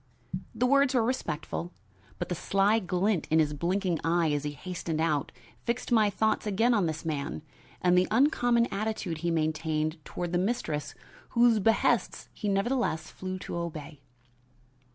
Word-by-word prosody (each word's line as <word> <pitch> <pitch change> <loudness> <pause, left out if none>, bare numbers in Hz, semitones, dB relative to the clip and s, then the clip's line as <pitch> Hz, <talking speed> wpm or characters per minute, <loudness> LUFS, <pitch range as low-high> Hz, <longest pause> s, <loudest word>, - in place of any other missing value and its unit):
The 240 +3 +1
words 275 +1 +4
were 240 - +4
respectful, 175 - -3 0.5
but - - -3
the - - 0
sly 195 +5 +2
glint 185 -1 0
in 160 - +3
his 150 -2 +3
blinking 175 +2 0
eyes 165 -1 +2
as 145 - -5
he 145 - -3
hastened 170 -1 -4
out 155 -3 0 0.3
fixed 240 +1 -2
my 220 -3 +5
thoughts 220 +2 0
again 225 +5 +3
on 200 -6 +2
this 160 +1 -4
man 140 - -3 0.4
and 180 0 +4
the 180 0 +4
uncommon 245 -1 +3
attitude 200 -5 -2
he 170 +1 -1
maintained 155 -1 -1
toward 175 +3 -4
the 175 - +1
mistress 175 -8 -2 0.4
whose 235 -2 +5
behests 225 +3 +1
he 210 - -3
nevertheless 200 -3 0
flew 185 0 -5
to - - -5
obey. 155 -4 -6
180 Hz, 155 wpm, -29 LUFS, 160-220 Hz, 0.5 s, my